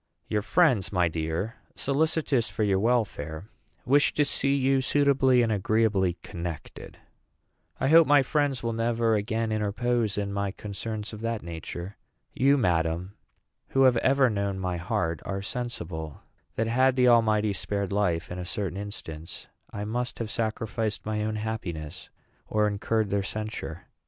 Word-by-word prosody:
"Your 105 - 0
friends, 125 - +3
my 90 -3 +3
dear, 80 +7 -3 0.2
solicitous 145 -3 +1
for 110 - -2
your 100 -2 +2
welfare, 100 -6 -1 0.3
wish 140 +4 +4
to 150 - +2
see 140 0 +1
you 135 0 +2
suitably 135 -2 +3
and 115 - +1
agreeably 100 -3 +1
connected." 85 -3 -7 0.8
"I 135 - +1
hope 160 +2 +7
my 145 -1 +6
friends 145 -2 0
will 115 0 -1
never 115 0 +1
again 110 +1 0
interpose 110 +1 0
in 100 -1 -2
my 100 -1 -2
concerns 105 +2 -5
of 105 - -8
that 115 -1 -2
nature. 85 +3 -7 0.4
You, 140 +2 +4
madam, 85 -3 0 0.5
who 135 - +2
have 130 -2 +5
ever 135 +2 +4
known 100 -3 -1
my 90 -2 -2
heart, 85 -1 -1
are 100 0 -4
sensible 85 - -5 0.3
that, 115 - 0
had 130 +3 +3
the 125 -1 +4
Almighty 110 -3 +4
spared 100 +1 -2
life 85 -5 0
in 90 - -5
a - - -3
certain 95 -1 -3
instance, 85 -6 -7 0.2
I 105 0 -5
must 120 +3 -3
have 110 -2 -4
sacrificed 110 -1 -2
my 105 0 -1
own 110 0 -2
happiness 95 -7 -5 0.4
or 105 0 +2
incurred 105 +1 0
their 100 0 +2
censure. 105 -5 -5
110 Hz, 150 wpm, -27 LUFS, 95-120 Hz, 0.8 s, hope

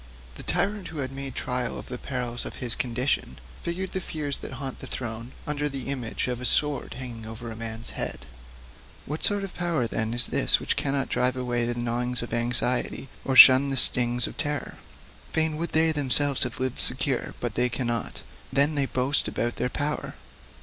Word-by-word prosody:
The - - -7
tyrant 195 +2 0
who 160 - -8
had 135 -2 -3
made 135 -1 -5
trial 125 -1 -1
of - - -7
the 125 -1 -5
perils 125 -2 -4
of - - -6
his 120 -3 +2
condition 125 +2 -1 0.2
figured 185 +2 -3
the 190 - -2
fears 150 -5 -1
that - - -7
haunt 135 -1 -6
a - - -6
throne 115 0 -5
under 150 0 -1
the 135 -1 -5
image 130 -4 -2
of 125 -1 -3
a - - -2
sword 145 0 +2
hanging 120 -3 -7
over 115 +1 -7
a - - -7
man's 115 0 -3
head.[G] 60 -1 -3 0.8
What 150 +3 -5
sort 205 -1 +3
of 195 - -6
power, 170 -8 0
then, 110 0 -1
is 120 - +3
this - - +3
which - - 0
cannot 135 -1 0
drive 125 0 +1
away 120 -2 -1
the 120 - -1
gnawings 120 +1 -1
of 120 - -6
anxiety, 120 +2 +1
or 135 - -1
shun 130 +1 +10
the 135 - -1
stings 120 -1 +4
of - - -7
terror? 145 -2 -3 0.6
Fain 160 -1 +1
would 170 +2 -3
they 160 0 +4
themselves 145 -1 +2
have 125 -1 -1
lived 130 -1 -2
secure, 130 0 -1
but 120 -3 -3
they 125 +2 +2
cannot; 120 -2 -2 0.3
then 140 +3 +4
they 140 -2 +1
boast 130 +3 +2
about 120 0 -2
their 125 - 0
power! 150 +3 -3
130 Hz, 195 wpm, -26 LUFS, 120-145 Hz, 0.8 s, shun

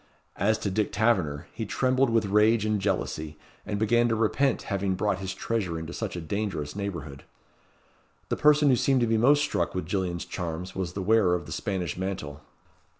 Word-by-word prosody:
As 110 +1 +2
to 100 - -3
Dick 105 +2 0
Taverner, 95 -10 +1
he 115 - -4
trembled 130 +4 +1
with 115 -2 +2
rage 105 +2 +3
and 105 -2 0
jealousy, 80 -6 -2 0.3
and 105 -1 -2
began 120 +3 +3
to 115 - +1
repent 115 +5 +1
having 100 -2 -1
brought 100 -1 0
his 95 -1 -4
treasure 95 -3 -2
into 80 +1 -6
such 105 -6 -4
a 85 - -4
dangerous 85 -4 -3
neighbourhood. 85 -9 -5 1.1
The - - +1
person 150 -1 +5
who 130 - +5
seemed 130 +1 +2
to - - +4
be 115 0 +2
most 145 +5 +5
struck 90 - -1
with 90 - -2
Gillian's 90 -1 -2
charms 90 0 -5
was 90 -3 -3
the 95 - -3
wearer 100 -3 +4
of 90 - -4
the - - -10
Spanish 95 -7 -3
mantle. 90 -6 -4
100 Hz, 190 wpm, -27 LUFS, 90-115 Hz, 1.1 s, person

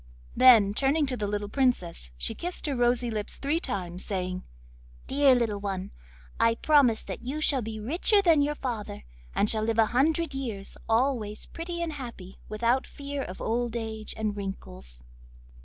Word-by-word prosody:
Then, 225 -6 +7
turning 280 +6 +2
to 265 -2 -2
the 210 -4 -2
little 205 0 -2
Princess, 205 - 0
she - - -2
kissed 355 +1 -4
her 285 -3 0
rosy 245 0 +2
lips 210 -2 -3
three 290 +4 0
times, 185 - -4
saying: 185 -2 -3 0.6
'Dear 275 -1 +4
little 225 -4 0
one, 195 -2 -4 0.5
I 230 0 +4
promise 275 -5 +3
that - - -6
you 265 +6 -4
shall 285 -4 +2
be 220 -1 -5
richer 335 - +2
than 335 -6 +4
your 295 +1 0
father, 220 - -5 0.3
and 205 - +3
shall 215 0 +3
live 225 +1 0
a 225 - +6
hundred 315 +4 +2
years, 230 -8 -4
always 225 -3 0
pretty 340 +1 -5
and 325 -2 -3
happy, 235 -9 -9
without 235 +4 +1
fear 280 0 -5
of 185 -7 -7
old 240 +1 -1
age 220 -2 -4
and 215 -2 -1
wrinkles. 60 - -8
235 Hz, 170 wpm, -27 LUFS, 205-275 Hz, 0.6 s, Then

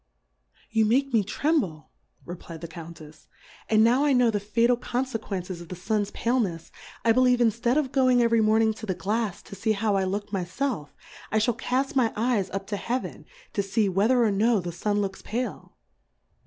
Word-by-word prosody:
You 220 0 +3
make 265 +4 +1
me 220 -3 +4
tremble, 205 - -1 0.3
re^ 175 - -6
fly* 165 - -8
d - - -17
the 170 - -6
Count 165 0 -10
tfs^ 155 -1 -14 0.4
and 220 0 +5
now 245 +5 +4
I 290 -2 +3
know 250 -2 +4
the 205 - 0
fatal 230 +4 +2
Confequences 220 -8 -4
of 170 - -10
the 180 - -5
Sun's 205 +3 -1
Pale 240 +4 0
nefs, 170 -6 -4 0.3
I 230 - +6
believe 250 +1 +4
inftead 235 +2 +2
of 280 -4 0
going 255 -2 +3
every 230 -1 +3
Morning 220 +1 +3
to 220 0 -9
the 185 - -1
Glafs, 210 0 -2
to - - -10
fee 220 +2 0
how 210 -1 0
I 190 -1 +1
look 205 +2 -4
my 190 -2 0
felf, 195 - -3 0.4
I 220 - +2
fhall 220 +2 +2
caft 265 +2 -1
my 240 -4 +3
Eyes 220 -4 0
up 195 0 -4
to - - 0
Heaven, 245 +5 -4 0.3
to 205 - +1
fee 200 +1 0
whether 220 +7 +3
or 220 - +3
no 215 +2 +2
the 175 -1 -4
Sun 205 +4 -1
looks 195 -1 -4
pale. 245 +4 -5
220 Hz, 205 wpm, -26 LUFS, 195-245 Hz, 0.4 s, I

